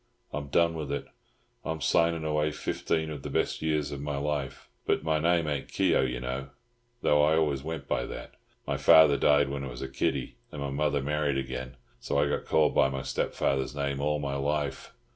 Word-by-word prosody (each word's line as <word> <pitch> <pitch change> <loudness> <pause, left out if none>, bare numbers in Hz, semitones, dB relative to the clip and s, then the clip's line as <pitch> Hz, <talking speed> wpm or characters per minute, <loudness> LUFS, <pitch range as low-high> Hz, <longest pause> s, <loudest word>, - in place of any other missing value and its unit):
I'm 70 -1 -4
done 85 +4 +3
with 75 -3 -4
it. 70 - -2 0.6
I'm 80 0 -3
signing 85 +3 +2
away 75 0 +1
fifteen 80 +1 -2
of 75 -3 -6
the - - -6
best - - -1
years 75 -2 0
of 70 -1 -5
my 70 -1 -3
life. 70 -2 -3 0.2
But - - +1
my 80 -1 +1
name 85 +1 +2
ain't 70 -2 -2
Keogh, - - +2
you 60 0 -3
know, 65 +2 -4 0.5
though 75 0 +4
I 75 +2 +4
always 75 -4 +1
went 80 +2 -5
by - - -1
that. - - -8 0.3
My - - -1
father 80 -2 +7
died 70 +1 +4
when 70 0 -4
I - - -4
was 60 +1 -7
a - - -3
kiddy, 65 -2 -2
and 75 - -7
my 70 -1 -3
mother 75 0 0
married 75 -1 0
again, 65 -1 -5 0.2
so - - -2
I 70 +1 +3
got 70 - -2
called 75 -1 +3
by 65 - +4
my 65 -1 -4
stepfather's 70 0 -1
name 70 -1 -2
all 75 +1 +1
my 70 -2 -3
life. 70 0 -2
70 Hz, 205 wpm, -28 LUFS, 70-75 Hz, 0.6 s, father